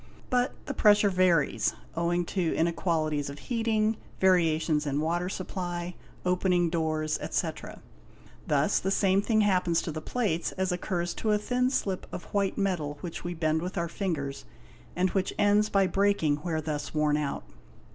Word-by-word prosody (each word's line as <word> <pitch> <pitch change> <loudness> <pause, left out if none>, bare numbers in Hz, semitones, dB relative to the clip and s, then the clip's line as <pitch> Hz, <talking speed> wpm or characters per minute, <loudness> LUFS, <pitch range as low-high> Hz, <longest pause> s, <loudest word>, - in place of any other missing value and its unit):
But 250 0 +2
the 285 - -3
pressure 205 -4 +5
varies, 165 - +2 0.2
owing 170 +1 0
to 175 -2 -1
inequalities 160 -3 0
of 140 - -8
heating, 225 - 0 0.2
variations 160 -4 +3
in 140 0 0
water 170 +3 0
supply, 180 -2 -4 0.3
opening 180 -2 +2
doors, 155 -2 0
etc. - - -4 0.6
Thus - - +2
the 190 - -2
same 195 0 +3
thing 215 +1 +2
happens 180 -4 +2
to 165 - -3
the 155 0 -5
plates 190 -6 -1
as 190 0 -1
occurs 175 -1 -2
to 215 -1 0
a - - +4
thin 250 +4 0
slip 195 -8 -2
of 175 - -6
white 200 -2 +1
metal 175 -7 -1
which' 170 -2 -6
we 175 0 -4
bend 160 -1 +1
with 180 +3 -5
our 170 0 0
fingers, 160 -7 -3 0.5
and 185 +1 +1
which 190 -1 -1
ends 205 +1 +3
by 195 -2 +3
breaking 190 -5 +2
where 160 0 -2
thus 150 -1 -4
worn 150 -1 +2
out. 150 -2 -2
175 Hz, 160 wpm, -28 LUFS, 160-195 Hz, 0.6 s, pressure